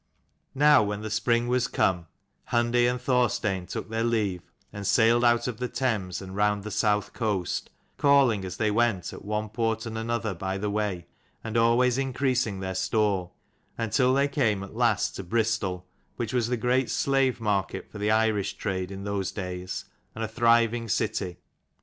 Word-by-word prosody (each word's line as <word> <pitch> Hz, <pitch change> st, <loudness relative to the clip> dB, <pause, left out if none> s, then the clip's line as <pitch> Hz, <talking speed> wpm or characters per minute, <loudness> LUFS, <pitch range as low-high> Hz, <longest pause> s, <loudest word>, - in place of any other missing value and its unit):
Now 145 Hz, -1 st, +6 dB
when 105 Hz, 0 st, -2 dB
the 110 Hz, -, -5 dB
spring 120 Hz, +2 st, +1 dB
was 125 Hz, 0 st, +1 dB
come, 90 Hz, -3 st, 0 dB, 0.4 s
Hundi 120 Hz, 0 st, +3 dB
and 125 Hz, 0 st, -2 dB
Thorstein 120 Hz, -7 st, 0 dB
took -, -, -5 dB
their 115 Hz, +1 st, -2 dB
leave, 105 Hz, -6 st, 0 dB, 0.3 s
and 100 Hz, -1 st, -5 dB
sailed 120 Hz, +1 st, +4 dB
out 120 Hz, 0 st, +3 dB
of 120 Hz, -3 st, -4 dB
the 125 Hz, +1 st, -2 dB
Thames 105 Hz, -9 st, -2 dB
and 95 Hz, 0 st, -8 dB
round 105 Hz, 0 st, +1 dB
the 105 Hz, -, -6 dB
South 105 Hz, -1 st, +1 dB
coast, 100 Hz, -6 st, -2 dB, 0.3 s
calling 135 Hz, -7 st, +4 dB
as 95 Hz, -, -6 dB
they 110 Hz, -1 st, +1 dB
went 110 Hz, -4 st, 0 dB
at -, -, -10 dB
one 105 Hz, +1 st, -2 dB
port 115 Hz, 0 st, -1 dB
and 110 Hz, -1 st, -4 dB
another 115 Hz, -2 st, -2 dB
by 95 Hz, +2 st, -3 dB
the 105 Hz, +1 st, -2 dB
way, 100 Hz, -5 st, -2 dB, 0.4 s
and 115 Hz, 0 st, -5 dB
always 120 Hz, +2 st, +3 dB
increasing 130 Hz, -6 st, 0 dB
their 95 Hz, 0 st, -3 dB
store; 95 Hz, -1 st, 0 dB, 0.5 s
until 115 Hz, +3 st, +2 dB
they 140 Hz, +2 st, +3 dB
came 115 Hz, -9 st, 0 dB
at 100 Hz, -, -10 dB
last 115 Hz, -3 st, +1 dB
to 95 Hz, -, -5 dB
Bristol, 100 Hz, -3 st, -1 dB, 0.3 s
which 120 Hz, -1 st, -4 dB
was 120 Hz, -3 st, +1 dB
the 125 Hz, 0 st, -1 dB
great 125 Hz, +2 st, +1 dB
slave 135 Hz, -2 st, +1 dB
market 100 Hz, -4 st, -1 dB
for 105 Hz, -, -8 dB
the 105 Hz, +1 st, 0 dB
Irish 110 Hz, -2 st, +1 dB
trade 95 Hz, -3 st, -3 dB
in 100 Hz, 0 st, -7 dB
those 100 Hz, -2 st, -2 dB
days, 90 Hz, -2 st, -5 dB, 0.3 s
and 110 Hz, -, -4 dB
a -, -, -1 dB
thriving 115 Hz, 0 st, +2 dB
city. 105 Hz, -5 st, -1 dB
110 Hz, 175 wpm, -27 LUFS, 100-120 Hz, 0.5 s, Now